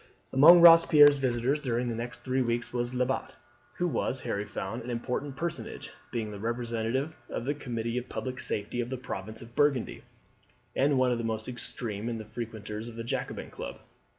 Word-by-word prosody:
Among 170 +6 +9
Robespierre's 160 -4 +8
visitors 130 +2 +1
during 125 -3 -1
the 120 - -1
next 120 +1 -6
three 130 0 0
weeks 120 -1 -1
was 120 +1 -2
Lebat, 130 +1 -1 0.4
who 175 - +1
was, 130 -4 -1
Harry 105 -4 -2
found, 105 +3 -5
an 120 - -8
important 125 +3 -3
personage, 170 +4 -5 0.2
being 110 -3 -3
the 100 - -7
representative 120 +5 -2 0.2
on 120 - -3
the 145 - +1
Committee 120 -4 -3
of 125 - -11
Public 130 0 -4
Safety 105 +4 -3
of 120 - -4
the 130 - -3
province 110 -3 -6
of 115 +1 -15
Burgundy, 145 -4 +1 0.7
and 140 0 +3
one 130 -1 +3
of 120 - 0
the - - -3
most 110 -1 -3
extreme 115 -3 -5
of 115 - -3
the 110 - -7
frequenters 110 0 -6
of 115 - -11
the 115 - -5
Jacobin 115 - -4
Club. - - -7
120 Hz, 185 wpm, -29 LUFS, 115-130 Hz, 0.7 s, Among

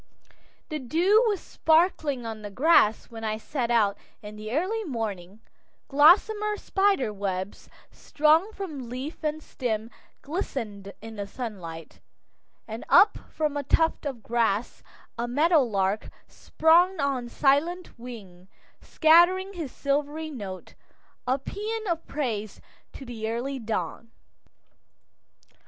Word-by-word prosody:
The 310 -1 -3
dew 345 - +3
was 410 -4 0
sparkling 315 -6 +1
on 220 -1 -6
the 205 - -6
grass 230 -3 +3
when 225 -1 -8
I 215 -1 -1
set 240 +1 -3
out 215 -4 +2 0.2
in 210 0 -8
the 215 +1 -7
early 380 - -1
morning, 215 - -5 0.5
gossamer 415 +9 +4
spider 390 - +1
webs 195 -1 -4 0.2
strung 315 +7 +2
from 310 - -7
leaf 265 +7 -6
and 305 0 -2
stem 225 -3 -3 0.3
glistened 230 - -4
in 225 -1 -9
the 200 -1 -4
sunlight, 180 - -7 0.7
and 225 +1 -6
up 410 - +6
from 305 -2 -2
a 290 - -1
tuft 320 +2 +1
of 250 -6 -6
grass 230 -1 0 0.4
a 240 - -1
meadow 305 +6 +4
lark 200 -4 -1 0.2
sprang 345 +3 +3
on 270 -4 -1
silent 300 +5 +1
wing, 200 -7 -10 0.3
scattering 350 +4 +4
his 325 -8 -5
silvery 295 +3 -2
notes, 195 -8 -8 0.5
a 260 +2 +2
paean 435 +10 -5
of 335 -2 -2
praise 220 -8 -3 0.3
to 270 - -9
the 225 -3 -5
early 260 +4 -3
dawn. 225 0 -4
265 Hz, 125 wpm, -26 LUFS, 220-320 Hz, 0.7 s, up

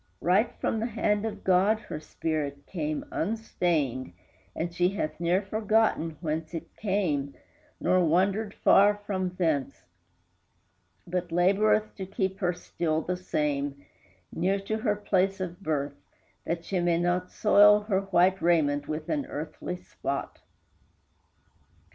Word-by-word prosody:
Right 190 +6 +2
from 225 - 0
the 225 - -1
hand 210 -2 0
of 220 - -7
God 195 +4 +3
her 180 -8 -6
spirit 150 -3 -3
came 155 -4 -3
Unstained, 165 - -1 0.4
and 170 +1 -3
she 175 +1 +2
hath 155 -6 -3
ne'er 175 +3 +2
forgotten 215 -6 +1
whence 160 0 -3
It 165 - -7
came, 170 -10 -1 0.4
nor 185 0 +3
wandered 195 +6 +1
far 205 +1 +6
from 185 -2 -1
thence, 145 - -1 1.2
But 175 0 -3
laboreth 210 +5 +3
to 190 -2 -5
keep 190 -1 -2
her 180 -2 +1
still 165 -2 -2
the 180 - -2
same, 145 -5 -2 0.5
Near 190 +4 +1
to 215 +2 -2
her 215 -2 +1
place 195 -1 +1
of 180 0 -5
birth, 145 -4 -2 0.5
that 170 0 -2
she 190 - -1
may 175 -1 +2
not 175 +1 0
Soil 210 0 +6
her 205 -2 0
white 190 -1 +2
raiment 145 -4 +2
with 155 0 -4
an 290 -3 -1
earthly 155 +4 -5
spot. 140 -5 -5
180 Hz, 135 wpm, -28 LUFS, 160-200 Hz, 1.2 s, far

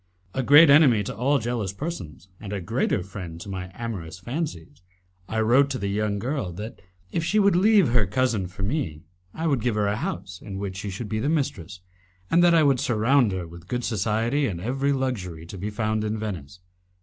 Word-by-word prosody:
A 135 - 0
great 145 +4 +8
enemy 135 -8 +6
to - - -5
all 135 +6 +2
jealous 115 -5 -2
persons, 100 - -6
and 105 -2 -8
a 100 - -2
greater 95 0 0
friend 90 -4 -8
to 100 - -9
my 95 -1 -5
amorous 95 -8 -5
fancies, 90 - -5 0.5
I 110 0 0
wrote 130 +6 +4
to 135 - -2
the 100 -4 -2
young 105 0 0
girl 120 -3 -2
that, 105 +6 -8 0.3
if 165 - -1
she 195 +6 +1
would 200 -3 +4
leave 200 - +5
her 115 -4 +2
cousin 110 -2 0
for 95 +2 -8
me, 95 - -2 0.3
I 160 - -3
would 140 -7 +1
give 120 -2 0
her 105 -1 +1
a 100 +1 0
house 90 -2 -5
in 100 -2 -7
which 95 -1 -4
she 100 +1 -4
should 100 +4 -5
be 110 +1 -2
the 140 +6 0
mistress, 95 - -2 0.5
and 175 +1 +5
that 175 -1 +6
I 160 - +5
would 135 -3 +3
surround 120 +1 +3
her 90 -3 -4
with 85 +1 -13
good 125 +2 -2
society 115 +6 0
and 95 - -3
with 90 - -7
every 135 +2 +1
luxury 100 - -2
to 85 - -9
be 100 +3 -3
found 110 0 -1
in 110 +1 -2
Venice. 90 -6 -6
110 Hz, 215 wpm, -25 LUFS, 95-135 Hz, 0.5 s, great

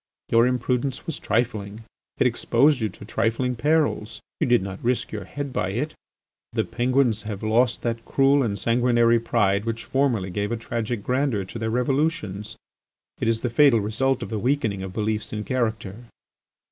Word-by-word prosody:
Your 115 +1 +5
imprudence 125 +1 -1
was 165 - -4
trifling; 110 -1 -1 0.3
it - - +2
exposed 145 -1 +3
you 110 - 0
to 100 - -12
trifling 115 +3 0
perils; 145 -5 0 0.2
you - - +1
did 120 -5 +4
not 95 0 -7
risk 125 +1 0
your 105 - -5
head 140 -2 -5
by 95 - -1
it. 150 +8 -2 0.6
The - - +1
Penguins 125 -3 +1
have 105 -1 -6
lost 115 +2 +2
that 115 -1 -2
cruel 140 +3 +3
and 105 -6 -1
sanguinary 120 +1 +3
pride 105 -4 +1
which 115 0 -4
formerly 120 -9 0
gave 105 +3 -2
a 120 - -1
tragic 115 -1 -3
grandeur 125 -6 0
to 115 - -8
their 110 0 -1
revolutions; 125 - -1 0.6
it - - -1
is 115 0 +1
the 125 - -1
fatal 130 -2 +5
result 120 +6 0
of - - -7
the 110 - -1
weakening 115 -5 0
of 95 -1 -5
beliefs 110 +1 -2
and 105 0 -4
character. 110 -6 -2
115 Hz, 170 wpm, -24 LUFS, 105-130 Hz, 0.6 s, Your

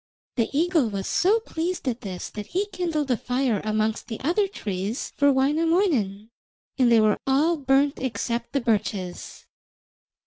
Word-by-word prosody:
The 230 -3 +1
eagle 320 -4 +2
was 195 -2 -4
so 410 +6 +3
pleased 345 - -3
at 245 -1 -1
this 185 -3 -6
that 210 -1 -7
he 385 +3 -1
kindled 310 -6 -1
a 245 - +2
fire 250 -4 0
amongst 215 +1 -1
the 225 - -5
other 360 +8 +2
trees 205 - -4
for 285 0 +4
Wainamoinen, 275 - +1 0.5
and 245 -2 +4
they 230 - +6
were 215 -1 +3
all 295 +6 +3
burnt 275 0 +2
except 235 -1 -3
the 275 - +1
birches. 205 -5 -2
260 Hz, 150 wpm, -25 LUFS, 215-320 Hz, 0.5 s, they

